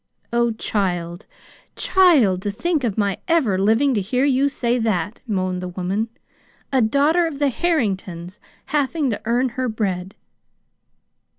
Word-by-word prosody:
"Oh, 235 0 +3
child, 175 -4 -2 0.5
child, 285 - +4
to 205 - -2
think 310 - -1
of 225 -4 -1
my 200 -3 0
ever 315 - +2
living 225 +8 +3
to 210 - +1
hear 250 +8 0
you 275 0 +2
say 245 -3 0
that!" 210 -2 -1
moaned 185 -3 -1
the 180 - -4
woman; 190 +5 -2 0.3
" - - -27
a 260 - +4
daughter 290 +9 +3
of 305 -4 -6
the 285 -1 +2
Harringtons 195 - -2 0.3
having 290 -1 0
to 205 - -4
earn 245 +3 +1
her 255 +1 -2
bread!" 195 -4 -3
225 Hz, 150 wpm, -21 LUFS, 190-275 Hz, 0.5 s, child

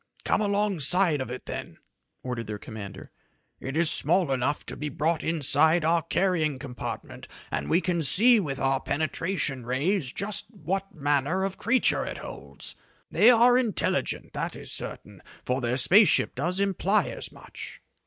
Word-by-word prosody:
"Come - - +2
alongside 195 -6 +2
of 130 - -5
it 125 +1 -7
then," - - -7 0.5
ordered 125 -3 -4
their 105 -1 -4
commander. 100 -3 -9 0.5
"It 135 +3 -5
is 170 -1 +3
small 170 0 +2
enough 135 +3 -1
to - - -6
be 150 - -4
brought 155 +3 -1
inside 160 +1 +3
our 165 +1 +3
carrying 165 -4 0
compartment, 130 -2 -7 0.2
and - - -3
we 170 - +3
can 175 -2 -1
see 225 - +5
with 140 -8 -3
our 135 0 +1
penetration 155 -2 -2
rays 135 - -1
just 200 +5 -2
what 195 -1 -4
manner 145 +4 0
of 195 0 -3
creatures 240 +3 +2
it - - -6
holds. - - -8 0.4
They 220 - +6
are 245 +1 +6
intelligent, 235 -5 -1
that - - -3
is - - -7
certain, - - -7 0.2
for 125 +1 -1
their 120 +1 0
space 195 - +6
ship - - +2
does 175 +8 -1
imply 200 +1 +1
as - - -7
much." - - -10
160 Hz, 160 wpm, -26 LUFS, 135-195 Hz, 0.5 s, They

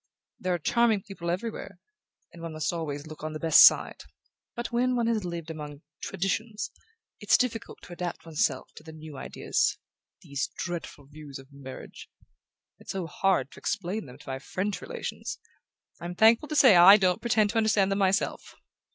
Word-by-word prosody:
"There 180 -1 0
are - - -1
charming 220 +3 +2
people 185 -4 -6
everywhere... 200 +1 -4 0.6
and 170 - -12
one 165 -1 -6
must 155 +2 -2
always 150 -3 -4
look 155 -1 -11
on 155 0 -4
the 155 - -5
best 160 -1 +7
side... - - +5 0.6
but 240 +1 -4
when 250 +1 +1
one 235 -1 +1
has 225 -3 0
lived 170 -2 -5
among 150 -2 -8 0.2
Traditions 210 +3 -3 0.5
it's - - +4
difficult 235 -3 -3
to 175 - -10
adapt 175 -1 -5
one's 160 -2 0
self 130 -2 -1
to - - -11
the 160 0 -11
new 155 -1 -10
ideas...These 140 +1 -3
dreadful 170 -5 -5
views 145 -1 -10
of 135 +1 -15
marriage... 135 -2 -10 0.7
it's - - -7
so 190 -3 -3
hard 165 -4 0
to - - -13
explain 205 -2 -3
them 125 0 -12
to 145 - -17
my 130 0 -3
French 190 +8 -3
relations...I'm 180 - -8
thankful 225 +8 +5
to 305 - -3
say 260 -9 +7
I 180 +4 +9
don't 185 -3 +1
pretend 215 -3 +2
to 230 - -2
understand 215 -3 +3
them 195 - 0
myself! 195 +1 0
180 Hz, 175 wpm, -27 LUFS, 155-215 Hz, 0.7 s, I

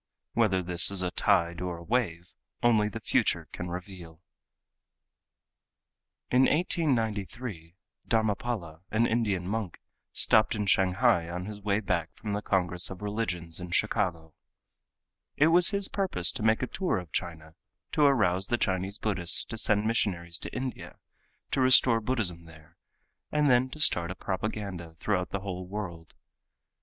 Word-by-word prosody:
Whether 95 -5 +2
this 90 -1 +4
is 95 -2 -1
a 90 - -1
tide, 85 -4 +1
or 90 -2 -3
a 85 - -11
wave, 90 -6 -2 0.3
only 110 -3 +4
the - - -6
future - - 0
can 90 - -6
reveal. 90 -2 -8 2.1
In 130 +1 +5
1893 115 - -1 0.3
Dharmapala, 105 -6 -1
an 115 +2 +2
Indian 105 -6 0
monk, 105 -3 -3 0.3
stopped 110 +1 +3
in 105 -1 -2
Shanghai 95 -1 +2
on 90 +1 -5
his 105 0 -7
way 100 +1 0
back 85 -6 -2
from 105 -2 -5
the 105 - -2
Congress 90 -3 0
of 95 +1 -9
Religions 90 -6 -3
in 90 0 -7
Chicago. 85 -5 -1 1.0
It 150 +3 +5
was 175 +1 +5
his 200 -1 0
purpose 185 - 0
to - - -7
make 110 +2 +2
a - - +2
tour 185 +7 -1
of 90 -3 -7
China, 80 -3 -4 0.4
to 155 - 0
arouse 95 -10 +3
the 120 - +1
Chinese 95 0 -1
Buddhists 95 -6 +1
to 115 - -7
send 105 -2 +2
missionaries 90 -6 0
to - - -7
India 130 0 -6 0.5
to 135 - +1
restore 130 -3 +6
Buddhism 105 -8 -1
there, 80 -2 -17 0.6
and 150 -2 +3
then 125 +1 +3
to 155 - -10
start 85 - +4
a 90 - -5
propaganda 95 -5 -4
throughout 90 +2 -1
the 100 - -4
whole 90 -2 -5
world. 90 -5 -7
100 Hz, 150 wpm, -28 LUFS, 90-115 Hz, 2.1 s, restore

